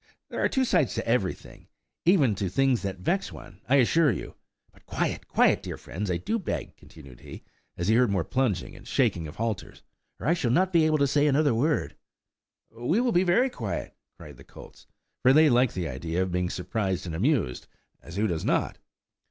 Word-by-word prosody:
There - - -3
are - - +3
two 265 -1 +1
sides 175 - +1
to 115 - -3
everything, 115 -5 -2 0.4
even 160 - +4
to 95 -1 -2
things 135 +4 +2
that 100 -1 -4
vex 180 - -1
one, - - -13
I 135 - +5
assure 150 +4 +4
you! 95 - -6 0.4
But, - - -24
quiet!–quiet! - - +1
dear - - -6
friends, 100 +3 -6
I 90 - 0
do 225 - -2
beg," 190 - -4
continued 70 -6 -15
he, - - -11 0.3
as 85 - -2
he 110 - +4
heard 120 0 +4
more 95 -4 0
plunging 110 -2 -1
and - - -14
shaking 80 -2 0
of 75 - -10
halters, 110 -3 -4 0.4
"or - - -7
I 160 - +3
shall 160 -9 -1
not 185 +9 +2
be 160 -2 +4
able 155 -1 +2
to 140 - +3
say 145 +2 +2
another 145 -1 +3
word!" 145 +7 0 0.8
"We 120 - 0
will 245 0 +1
be 180 -2 +3 0.2
quiet," 115 - -5 0.2
cried - - -12
the - - -14
colts, - - -15 0.3
for 130 +1 +5
they 155 0 +6
liked 125 0 +3
the 90 -3 -2
idea 80 +7 -2
of 95 - -4
being 90 0 -1
surprised 95 -1 -2
and 85 - -5
amused, 100 - 0 0.3
as 85 - -11
who 105 +2 +1
does 85 -6 -2
not? - - 0
115 Hz, 200 wpm, -26 LUFS, 90-150 Hz, 0.8 s, they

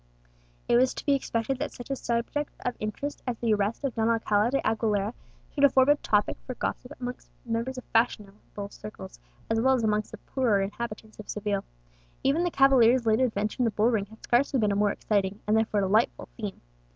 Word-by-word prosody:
It 240 - +4
was 255 +1 +3
to - - -7
be 285 - +4
expected 260 -1 -1
that 295 - -3
such 245 +2 -8
a - - +1
subject 240 +5 -2
of 250 - -1
interest 245 +7 -4
as 245 -2 -1
the 230 -1 +1
arrest 205 +5 -1
of 275 -3 -1
Don 225 0 +1
Alcala 220 -1 +2
de 275 +2 +1
Aguilera 215 -1 0 0.4
should 285 - -1
afford 265 -1 +6
a 290 - +7
topic 210 -6 +1
for 255 - -4
gossip 250 +2 -4
amongst 250 0 -6 0.2
members 235 +3 -2
of 255 - -6
fashionable 210 -3 -1
circles, 85 - -10 0.3
as 225 0 +1
well 265 +2 +4
as 240 - -1
amongst 215 -1 +1
the 220 - -8
poorer 235 -3 +1
inhabitants 215 +2 -5
of 215 - -10
Seville. 205 -1 -2 0.6
Even 280 +6 +2
the 350 - +1
cavalier's 260 -4 +5
late 220 +1 +3
adventure 215 -1 0
in - - +4
the - - +3
bull 220 +3 +2
ring 205 -3 0
had 220 +2 -17
scarcely 260 +2 +2
been 210 -2 +2
a - - 0
more 205 0 +3
exciting, 200 -1 -1
and 210 - +2
therefore 220 -2 +2
delightful, 210 +4 +1
theme. 210 -4 -6
225 Hz, 205 wpm, -27 LUFS, 210-255 Hz, 0.6 s, a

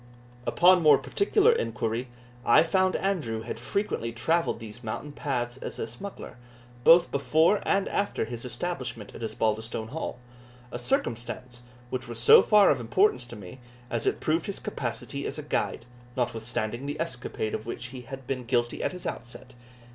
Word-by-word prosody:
Upon 180 0 +6
more 150 -3 +7
particular 415 - +3
inquiry, 125 - -1 0.4
I 140 +7 +6
found 185 +2 +2
Andrew 150 - -1
had 115 - -5
frequently 125 - -2
travelled 165 +5 0
these 115 +2 -10
mountain 115 +7 -5
paths 125 -4 -3
as - - -6
a - - -2
smuggler, 120 - -8 0.5
both 170 +4 +7
before 160 +8 +3
and 195 0 +2
after 200 - -1
his 120 0 -6
establishment 125 - -4
at - - -10
Osbaldistone 110 0 -1
Hall 155 -3 -4 0.5
a 120 - -4
circumstance 120 0 -2 0.3
which 125 -1 -3
was 120 -1 -6
so 120 - +8
far 210 -2 +6
of 140 - +1
importance 125 - +2
to 120 - -8
me, 105 +4 -10 0.3
as 115 - -1
it - - +1
proved 160 +2 0
his 200 - 0
capacity - - -4
as - - -4
a - - -5
guide, 115 - -2 0.3
notwithstanding 120 +1 -2
the 145 +1 -4
escapade 125 -8 -3
of 110 - -4
which 120 +1 -5
he 130 0 -8
had 135 +2 -9
been 130 -1 -3
guilty 120 -1 0
at - - -1
his 180 - -7
outset. 125 +1 -6
125 Hz, 165 wpm, -27 LUFS, 115-165 Hz, 0.5 s, so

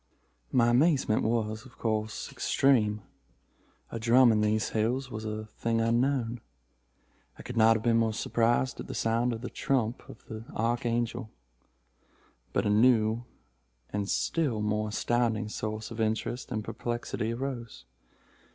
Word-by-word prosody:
"My 120 -1 +4
amazement 130 -3 +3
was, 110 -1 -1
of 130 - -16
course, 110 -1 -2
extreme. 105 -7 +2 0.9
A 115 - -4
drum 120 +2 +6
in 105 -1 +2
these 105 0 +1
hills 125 +4 -1
was 110 -1 -5
a 110 0 -4
thing 115 +2 -2
unknown. 120 0 +1 1.0
I - - -10
could 125 - -7
not 115 0 +6
have 110 - -2
been 115 -1 +3
more 115 -1 +2
surprised 115 +3 +1
at - - -6
the - - -6
sound 115 +2 +1
of 115 -1 -4
the 125 - -5
trump 125 -3 0
of - - -13
the 110 0 -7
Archangel. 120 0 -1 1.2
But - - 0
a - - +2
new 110 +1 +3 0.7
and 100 -1 -2
still 145 -10 0
more 105 0 0
astounding 115 -1 0
source 110 +1 -4
of 115 0 -4
interest 110 +3 -2
and 110 -1 -2
perplexity 120 -1 -3
arose. 120 - -5
115 Hz, 140 wpm, -29 LUFS, 110-120 Hz, 1.2 s, drum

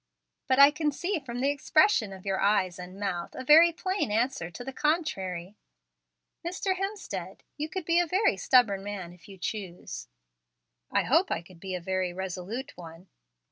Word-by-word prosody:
"But 260 -1 +3
I 280 +1 +9
can 300 0 0
see 350 +5 -2
from 245 -3 -6
the 275 +2 +3
expression 285 - +3
of 190 0 -11
your 195 -1 0
eyes 195 -3 +2
and 180 +2 -9
mouth 175 -4 -3
a 260 - -5
very 320 +5 +8
plain 370 - -2
answer 225 -5 0
to 175 +8 -9
the 270 +1 -6
contrary. 200 - -1 0.9
Mr. 370 +2 -1
Hemstead, 390 +2 -5
you 305 +1 -4
could 365 +1 -4
be 335 +1 +3
a 350 - +2
very 375 - +2
stubborn 200 -1 +3
man 195 -4 -6
if 180 +2 -18
you 195 - -11
chose." 185 -2 -6 0.8
"I - - +2
hope - - +3
I - - -2
could 170 0 -17
be 190 0 -5
a - - -3
very 185 0 -2
resolute 190 +7 -5
one." 170 +1 -12
215 Hz, 180 wpm, -28 LUFS, 185-305 Hz, 0.9 s, I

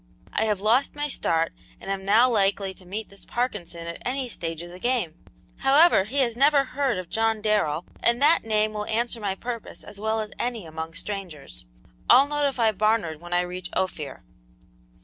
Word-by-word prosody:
"I 220 - +1
have 210 -3 0
lost 235 +8 +2
my 295 0 -1
start 165 -10 0 0.3
and 195 - -5
am 195 -1 -3
now 220 +5 +6
likely 200 -4 +1
to 185 -1 -18
meet 210 +4 -5
this 200 0 -11
Parkinson 185 -9 -3
at 170 0 -6
any 255 0 -2
stage 165 -5 -4
of 175 - -9
the 180 - -10
game. 240 -8 0 0.5
However, 275 - +5
he 250 +7 -5
has 235 -3 +1
never 280 +2 +5
heard 270 -4 -1
of 185 -1 -5
John 225 +2 +1
Darrell, 205 -7 +1
and 235 0 +2
that 300 +4 +5
name 215 -1 +1
will 210 0 -3
answer 235 +1 -1
my 200 -3 -2
purpose 235 +2 -6
as 200 - -9
well 220 +1 0
as 215 -1 -4
any 235 -6 -2
among 160 +1 -6
strangers. 185 - -6 0.4
I'll 265 +3 +8
notify 280 -6 +2
Barnard 210 -7 0
when 175 0 -10
I 175 0 +3
reach 180 +1 -5
Ophir." 155 -6 -3
215 Hz, 190 wpm, -25 LUFS, 180-240 Hz, 0.5 s, I'll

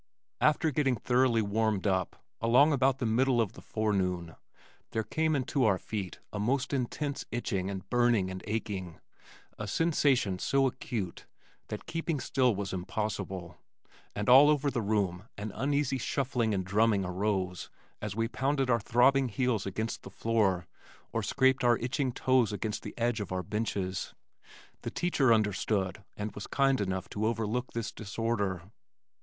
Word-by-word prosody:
After 155 +1 +3
getting 135 -2 +2
thoroughly 125 0 +2
warmed 105 -1 0
up, 95 -2 0 0.3
along 125 +7 +5
about 135 -1 +3
the 125 - -2
middle 125 +3 +2
of 110 -4 +1
the - - -12
forenoon, 90 -6 -1 0.6
there 110 0 0
came 155 +5 0
into 135 0 0
our 100 -5 +4
feet 95 -4 -5 0.2
a 105 - -3
most 130 +6 0
intense 140 +2 -2
itching 100 -5 -2
and 95 -2 -6
burning 120 -6 +2
and 95 0 -7
aching, 100 -6 -3 0.6
a 105 - -4
sensation 135 - +2
so 135 +6 +2
acute 110 -7 -4 0.4
that - - -6
keeping 165 -2 -2
still 125 -3 +2
was 100 -1 -4
impossible, 95 -1 -4 0.6
and 105 +1 -3
all 135 +4 +8
over 145 -1 +2
the 120 - -1
room 100 -3 0
an 105 +1 -4
uneasy 140 +3 0
shuffling 125 -3 0
and 95 -3 -1
drumming 100 0 +2
arose 95 0 -2 0.3
as 105 -1 -4
we 115 0 0
pounded 135 +1 0
our 115 - +3
throbbing 130 +4 +3
heels 115 -2 0
against 110 +4 -3
the - - -10
floor 105 -6 +1 0.5
or - - 0
scraped 130 0 +2
our 120 -1 +5
itching 130 +2 -1
toes 130 -3 +2
against 105 +1 -3
the 105 - -8
edge 120 -1 0
of 105 - -5
our 95 0 -1
benches. 95 -2 -3 0.7
The - - -4
teacher 145 -8 +2
understood 105 -3 +1
and 105 0 -3
was 105 - -7
kind 135 -3 +2
enough 95 -1 -2
to 105 +1 -1
overlook 115 +2 -2
this 115 -2 -3
disorder. 100 -4 -2
110 Hz, 155 wpm, -30 LUFS, 100-130 Hz, 0.7 s, all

